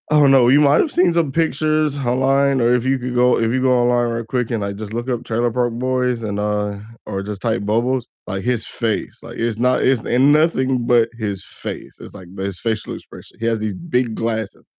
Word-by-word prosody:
I 150 - +2
don't 140 -2 +5
know, 130 -3 +5
you 140 +3 +6
might 145 -1 +5
have 315 - -1
seen 180 -6 +3
some 165 -4 +1
pictures 155 -1 0
online, 135 +1 +2
or 120 0 +3
if 125 0 -1
you 135 +1 +2
could 125 0 -4
go 125 0 +4
if 115 0 +1
you 130 - 0
go 130 0 +3
online 120 -1 +2
real 115 0 -3
quick 125 0 -2
and, 115 -3 -1
like, 100 0 -3
just 105 +1 -7
look 120 +2 -4
up 120 -1 -2
Trailer 120 +1 -1
Park 120 0 0
Boys 125 0 -1
and, 100 -2 -3
uh, 105 -1 -2 0.3
or 95 - -4
just 100 -1 -6
type 110 -3 -1
Bubbles. 120 +3 0 0.2
Like, 95 -1 -4
his 120 -2 0
face, 115 -2 -2
like, - - -10
it's 115 -2 -1
not 125 +2 +2
it's 130 -3 +2
ain't 125 +2 +2
nothing 135 -5 +2
but 120 -1 +3
his 100 -4 -4
face. - - -7
It's - - -11
like 95 -3 -11
his 95 -1 -4
facial 110 -2 -2
expression. - - -13
He 115 - -3
has 115 -1 +1
these 105 -1 -2
big 125 - -1
glasses. 110 -2 -3
120 Hz, 230 wpm, -19 LUFS, 110-130 Hz, 0.3 s, you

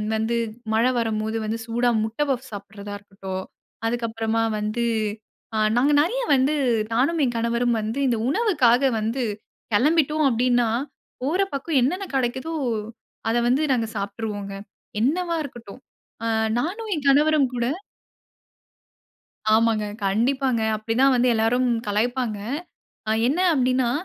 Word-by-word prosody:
வந்து 220 +2 0 0.4
மழை 235 +3 +3
வரும்போது 220 -1 -1
வந்து 220 +1 -2
சூடா 240 +1 +1
முட்ட 220 +6 -4
பஃப்ஸ் 260 -1 -2
சாப்பிடுறதா 200 0 -8
இருக்கட்டும். 195 -2 -6 0.4
அதுக்கு 235 0 -1
அப்புறமா 225 0 -1 0.2
வந்து, 215 +3 -1 0.9
நாங்க 280 +4 +4
நிறைய 475 +11 0
வந்து 270 +3 +2 0.4
நானும், 275 +8 +2
என் 240 -2 -2
கணவரும் 235 +1 +1
வந்து 220 +5 -3
இந்த 240 -2 +1
உணவுக்காக 280 - +3
வந்து 230 +4 -1 0.5
கிளம்பிட்டோம் 305 +4 +3
அப்படின்னா, 245 -1 +2 0.5
போற 330 +9 +1
பக்கம் 280 +1 +1
என்னென்ன 365 +10 0
கிடைக்குதோ, 260 +5 -1 0.7
அத 230 - +1
வந்து 275 +5 +2
நாங்க 230 -3 0
சாப்ட்டுருவோங்க. 200 0 -4 0.5
என்னவா 335 +7 +1
இருக்கட்டும். 240 -4 -10 0.8
நானும் 415 - -3
என் 290 -2 -5
கணவரும் 295 0 +4
கூட 235 - 0 1.9
ஆமாங்க, 225 -1 +3 0.2
கண்டிப்பாங்க 245 +4 +1 0.2
அப்படிதான் 230 +5 +2
வந்து 250 0 +3
எல்லாரும் 235 +3 +2 0.2
கலாய்ப்பாங்க. 225 +1 0 0.9
என்ன 300 +7 0 0.2
அப்டின்னா, 255 -2 +2
245 Hz, 115 wpm, -24 LUFS, 225-275 Hz, 1.9 s, நாங்க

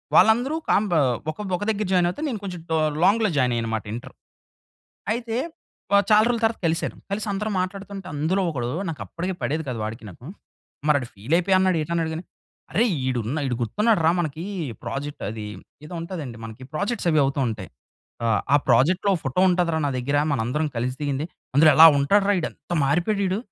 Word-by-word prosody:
వాళ్ళందరూ 245 +7 +5
కాంబ 205 -1 +2 0.4
ఒక 155 - -16 0.2
ఒక 180 - -4
దగ్గర 215 -1 0
జాయిన్ 180 -2 +4
అవుతే 180 - -6
నేను 230 -5 -3
కొంచెం 180 -3 -5
టొ 160 - +3 0.3
లాంగ్‌లో 215 +3 +4
జాయిన్ 125 -2 +2
అయ్యాను 115 -1 -1
అన్నమాట 110 -1 -3
ఇంటర్. 120 +3 -7 1.0
అయితే 230 -1 -4 0.6
ఆహ్, 200 - +5
చాలా 215 0 +6
రోజుల 235 -1 0
తర్వాత 225 0 0
కలిసాను. 165 +1 -1 0.2
కలిసి 210 +2 -2
అందరం 210 +2 -2
మాట్లాడుతుంటే 195 +1 -6
అందులో 160 +7 +1
ఒకడు 120 -5 -3 0.2
నాకు 150 -9 -6
అప్పటికే 170 - -4
పడేది 155 +3 -1
కాదు 120 -3 -4
వాడికి 110 +2 -6
నాకు. 100 +7 -14 0.6
మరి 150 - +5
ఆడు 125 - -6
ఫీల్ 110 +10 -4
అయిపోయా 190 +2 +2
అన్నాడో 185 -2 +2
ఏటన్నాడో 165 +1 -1
గాని. 165 +3 -5 0.5
"అరె 230 - +3 0.2
ఈడున్న 125 +2 -1
ఈడు 125 - -1
గుర్తున్నాడురా 165 - +2
మనకి. 160 -1 -3 0.4
ప్రాజెక్ట్ 145 +1 -5
అది 110 -1 -6 0.4
ఏదో 155 - -9
ఉంటాదండి 160 -9 -6
మనకి. 110 +3 -10
ప్రాజెక్ట్స్ 205 +5 -1
అవి 155 - +3
అవుతూ 135 +1 -1
ఉంటాయి. 110 -4 -5 0.6
ఆహ్, 110 -2 +2
ఆ - - +9
ప్రాజెక్ట్‌లో 175 - +4
ఫోటో 135 +6 -1
ఉంటది 175 -1 +1
రా - - +1
నా - - 0
దగ్గర 140 +3 -1 0.2
మనందరం 135 +5 0
కలిసి 125 +2 -1
దిగింది. 145 0 -1 0.3
అందులో 155 +2 +7
ఎలా 160 - +11
ఉంటాడు 195 +9 +3
రా - - +4
ఈడు. - - -2
ఎంత 175 - -7
మారిపోయాడు 175 +9 +1
ఈడు. 190 +2 0
160 Hz, 185 wpm, -24 LUFS, 130-195 Hz, 1.0 s, ఎలా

